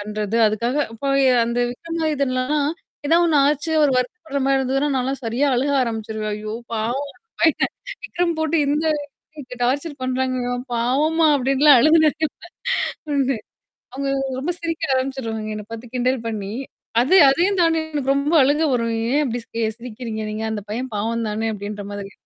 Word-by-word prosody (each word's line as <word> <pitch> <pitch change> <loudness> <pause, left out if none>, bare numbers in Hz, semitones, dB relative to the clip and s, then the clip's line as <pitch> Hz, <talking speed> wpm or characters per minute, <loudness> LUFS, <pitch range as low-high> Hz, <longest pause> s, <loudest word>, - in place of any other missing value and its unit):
பண்றது. 210 +1 -3
அதுக்காக 235 +6 0
அப்ப 275 +5 -3 0.3
அந்த 235 +1 -2
விக்ரமாதித்தன்லலாம், 290 -2 -1 0.4
ஏதாவ 335 +3 +4
ஒண்ணு 320 -3 +2
ஆச்சு 300 +2 0
அவரு 290 -2 +4
வருத்தப்படுற 280 +2 -3
மாரி 275 0 +3
இருந்ததுன்னா, 270 +2 0
நான்லாம் 265 +2 -1
சரியா 235 +6 +1
அழுக 275 +3 +1
ஆரம்பிச்சுருவேன். 220 -2 -3
ஐயோ! 215 0 -5 0.2
பாவம் 245 +6 -2 0.3
பயன் 325 -2 +3 0.3
விக்ரம் 345 -1 -1
போட்டு 315 +1 +1
இந்த 300 +2 +1 0.5
அளவுக்கு 270 -5 -10
டார்ச்சர் 280 +4 -1
பண்றாங்கவன். 255 -1 -1
பாவோம்மா 295 +8 +2
அப்டின்னுலாம் 275 +1 +5
அழுதுனே 310 +2 +5 1.1
ஒண்ணு. 270 -2 +1 0.6
அவங்க 275 +1 -2 0.3
ரொம்ப 310 +7 -1
சிரிக்க 330 -5 -1
ஆரம்பிச்சுருவாங்க. 230 -5 -3
என்ன 210 -1 -7
பாத்து 230 +1 -8
கிண்டல் 250 -1 0
பண்ணி. 205 -3 -4 0.5
அது 275 +10 +3
அதையும் 365 +7 +2
தாண்டி 330 -1 +3
எனக்கு 275 -2 +1
ரொம்ப 285 +3 0
அழுங்கா 295 +4 +2
வரும். 230 -2 0 0.2
ஏன் 300 +1 +3
அப்டி 240 -2 -3
சி 230 - -4 0.2
சிரிக்கிறீங்க 230 -2 -6
நீங்க 215 +1 -3
அந்த 210 -2 -4
பையன் 250 +3 -4
பாவம் 225 +2 -1
தானே 220 +1 -1
அப்டின்ற 205 0 -6
மாதிரி. 200 -1 -6
260 Hz, 150 wpm, -21 LUFS, 230-290 Hz, 1.1 s, அப்டின்னுலாம்